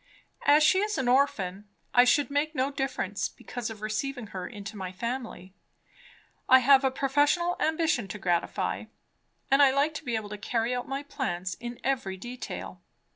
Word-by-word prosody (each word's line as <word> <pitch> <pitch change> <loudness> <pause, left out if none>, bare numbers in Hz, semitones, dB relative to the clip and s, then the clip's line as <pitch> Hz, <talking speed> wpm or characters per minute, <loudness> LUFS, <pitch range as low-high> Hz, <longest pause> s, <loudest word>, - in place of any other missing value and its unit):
As 295 +2 +7
she 375 +5 +5
is 420 +1 -1
an 260 - -1
orphan, 210 -7 +1 0.2
I 245 0 +7
should 280 +2 +3
make 300 +2 0
no 265 +1 0
difference 255 -8 -2
because 245 -1 -6
of 220 -2 -9
receiving 245 +4 -3
her 185 -2 -4
into 210 -1 -8
my 190 -2 -5
family. 225 -3 -5 1.0
I 260 - +9
have 270 +1 +5
a 265 - +4
professional 290 +7 +1
ambition 315 -8 +1
to 210 - -6
gratify, 175 -4 -1 0.7
and 275 +1 +6
I 280 - +8
like 280 +4 +1
to 300 - -6
be 240 -4 -2
able 215 -2 -3
to 210 0 -7
carry 230 +2 -1
out 245 0 -3
my 275 +1 -3
plans 185 - -3
in 240 0 -7
every 235 -8 -1
detail. 245 +5 -7
250 Hz, 175 wpm, -28 LUFS, 210-280 Hz, 1.0 s, I